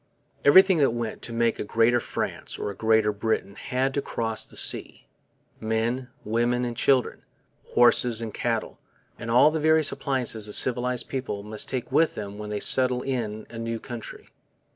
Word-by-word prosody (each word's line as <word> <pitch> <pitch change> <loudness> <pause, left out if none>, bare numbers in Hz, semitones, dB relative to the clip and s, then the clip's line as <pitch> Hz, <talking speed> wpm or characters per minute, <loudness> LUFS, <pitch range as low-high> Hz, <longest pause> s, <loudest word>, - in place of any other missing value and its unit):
Everything 185 +4 +7
that 135 -5 +2
went 115 -2 -4
to 115 - -5
make 115 0 0
a - - -1
Greater 115 +3 +2
France - - -5
or - - -3
a - - -10
Greater 110 0 +2
Britain 105 -1 -2
had 130 +5 -2
to 140 - 0
cross 115 -4 -3
the - - -11
sea - - +1 0.5
men, 115 +3 -1 0.2
women, 120 +3 0
and 120 -1 -4
children, 130 0 +1 0.5
horses 120 -1 +4
and 115 -2 -5
cattle, - - -2 0.5
all 125 +6 +6
the 160 - -2
various 155 0 +3
appliances 125 -6 -3
a 105 - -7
civilized 125 0 0
people 125 -7 -4
must 105 +1 -5
take 130 -2 -4
with 165 - +3
them 105 -1 -7
when 105 0 -6
they 105 -1 -3
settle 125 +1 +2
in 110 -5 -3
a 115 - -7
new 115 0 -3
country. 120 -3 -9
120 Hz, 170 wpm, -25 LUFS, 110-130 Hz, 0.5 s, Everything